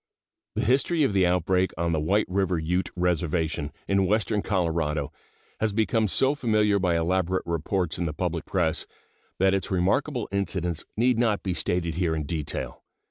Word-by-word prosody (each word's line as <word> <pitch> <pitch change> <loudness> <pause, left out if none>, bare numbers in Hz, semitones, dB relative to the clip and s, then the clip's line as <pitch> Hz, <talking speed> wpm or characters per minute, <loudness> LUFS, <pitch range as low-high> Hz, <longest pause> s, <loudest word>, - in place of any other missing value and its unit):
The - - 0
history 140 +6 +2
of 135 - +2
the 95 -2 +4
outbreak 90 +1 +2
on 85 0 0
the 80 - +1
White 100 +8 +2
River 95 -1 0
Ute 90 +4 -1
Reservation, 85 -4 0 0.2
in 100 -1 +2
western 105 0 +1
Colorado, 80 -7 -1 0.5
has 110 -2 0
become 110 +1 +2
so 130 - +2
familiar 105 -7 +2
by 90 -3 +1
elaborate 90 +2 0
reports 85 +1 -1
in 85 - 0
the - - -2
public 85 0 -2
press 85 -4 0 0.5
that 95 +1 +3
its 95 -3 -1
remarkable 110 +8 0
incidents 90 -4 -2
need 120 +1 +3
not 110 -4 +1
be 95 - -1
stated 85 -2 -1
here 85 -3 +1
in 80 - -2
detail. 75 0 -4
90 Hz, 165 wpm, -26 LUFS, 85-105 Hz, 0.5 s, the